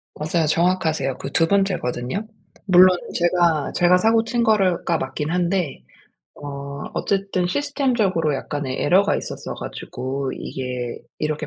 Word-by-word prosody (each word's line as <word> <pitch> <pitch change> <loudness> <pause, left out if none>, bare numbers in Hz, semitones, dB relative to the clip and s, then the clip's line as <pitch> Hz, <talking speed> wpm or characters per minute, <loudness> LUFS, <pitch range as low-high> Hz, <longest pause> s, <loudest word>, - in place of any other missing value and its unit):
맞아요. 160 +2 0
정확하세요. 165 -4 +1
그 135 - -6
2 165 - +3
번째거든요. 190 - -1 0.4
물론 185 -1 +6 0.2
제가, 170 -4 +2
제가 175 +1 +4
사고 225 +3 +3
친 235 +1 0
거를 195 -6 +2
가 170 - +2
맞긴 150 +3 -3
한데 180 -3 -1 0.5
어 140 -1 -7
어쨌든 195 -2 0
시스템적으로 220 - 0
약간의 135 -1 -4
에러가 195 +6 +4
있었어 - - -5
가지고 130 +2 -5
이게 125 -2 -5 0.2
이렇게 155 0 -2
175 Hz, 300 characters per minute, -22 LUFS, 145-195 Hz, 0.5 s, 물론